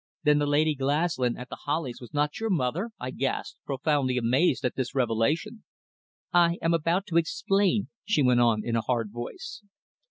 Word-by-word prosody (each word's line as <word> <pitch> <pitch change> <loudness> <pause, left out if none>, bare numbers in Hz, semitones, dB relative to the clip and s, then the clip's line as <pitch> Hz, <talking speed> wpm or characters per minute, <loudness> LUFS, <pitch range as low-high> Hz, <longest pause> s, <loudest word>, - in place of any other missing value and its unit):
"Then 150 -1 +4
the 145 - 0
Lady 150 +2 +3
Glaslyn 140 -2 0
at 125 0 -8
The - - -7
Hollies 145 -5 -3
was 120 - -11
not 150 0 -1
your 225 0 -2
mother?" 170 - 0
I 125 +1 -4
gasped, 135 +1 -3
profoundly 135 -2 0
amazed 130 +4 +2
at 125 - 0
this 130 +1 -4
revelation. 130 - 0 0.7
"I 170 -1 +4
am 165 0 +1
about 170 +4 +1
to 165 - +1
explain," 195 +4 +1
she 190 -8 +1
went 125 -1 +4
on 115 -3 +2
in 115 - -1
a 115 - +2
hard 115 -3 -1
voice. 295 - -7
145 Hz, 180 wpm, -27 LUFS, 125-170 Hz, 0.7 s, Then